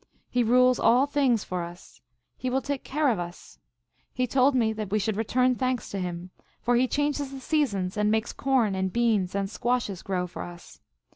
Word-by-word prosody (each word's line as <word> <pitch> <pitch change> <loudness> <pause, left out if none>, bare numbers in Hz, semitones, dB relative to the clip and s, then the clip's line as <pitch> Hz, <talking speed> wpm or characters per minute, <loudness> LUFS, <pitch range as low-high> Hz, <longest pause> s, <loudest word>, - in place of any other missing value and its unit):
He 245 - +2
rules 250 +2 +4
all 245 +4 +5
things 275 -6 +1
for 180 -1 -3
us. 170 +1 -10 0.3
He 255 - -3
will 265 +2 0
take 285 -2 -3
care 295 +1 +1
of 220 -7 0
us. 175 0 -8 0.5
He 255 - 0
told 265 +2 +3
me 225 -3 +2
that 215 -2 -5
we 210 - +1
should 215 0 -1
return 250 +4 +2
thanks 255 -2 -2
to 200 - -3
him, 180 0 -5 0.3
for 245 - +1
he 250 +2 +3
changes 290 0 -1
the 270 0 -8
seasons, 215 - 0
and 210 0 +2
makes 220 +1 0
corn 260 -7 +1
and 190 0 -1
beans 215 -5 +1
and 200 -1 0
squashes 235 -3 -1
grow 185 -2 -2
for 180 - -8
us. 175 0 -10
235 Hz, 200 wpm, -27 LUFS, 195-255 Hz, 0.5 s, all